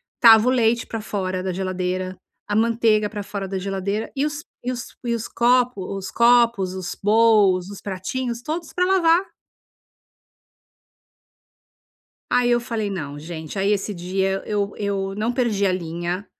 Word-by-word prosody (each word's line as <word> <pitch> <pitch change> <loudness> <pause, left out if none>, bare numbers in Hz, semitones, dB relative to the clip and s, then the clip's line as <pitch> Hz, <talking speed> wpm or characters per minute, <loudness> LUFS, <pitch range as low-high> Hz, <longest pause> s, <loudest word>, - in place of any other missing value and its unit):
estava 225 -1 +7
o - - +4
leite 235 -2 +2
pra 225 - -4
fora 185 -3 -3
da 185 -1 -2
geladeira, 185 0 -3 0.3
a 205 - -1
manteiga 220 -1 +2
pra 205 -1 -5
fora 200 -1 -5
da 190 0 -3
geladeira 195 +2 -3
e 280 +1 +1
os 295 0 -4 0.2
e 250 - -1
os 245 -1 -7
e 235 - 0
os 230 -1 -4
copo 240 -5 +1
os 195 -1 -6
copos, 235 -5 +4
os 185 -2 -5
bolws, 205 -4 +4
os 200 - -9
pratinhos, 230 +6 -4
todos 315 +4 -5
pra 360 - +2
lavar. 365 -1 +3 3.0
Aí 245 -1 +3
eu 240 0 +3
falei, 225 -3 -3
"Não, 145 -7 -5
gente" 160 +3 -7
aí 195 +1 +1
esse 205 0 -1
dia 190 +2 -1
eu 205 -1 -1
eu 195 -1 -2
não 220 +3 0
perdi 235 -5 0
a 190 - +3
linha, 175 +2 -3
205 Hz, 155 wpm, -22 LUFS, 190-235 Hz, 3.0 s, estava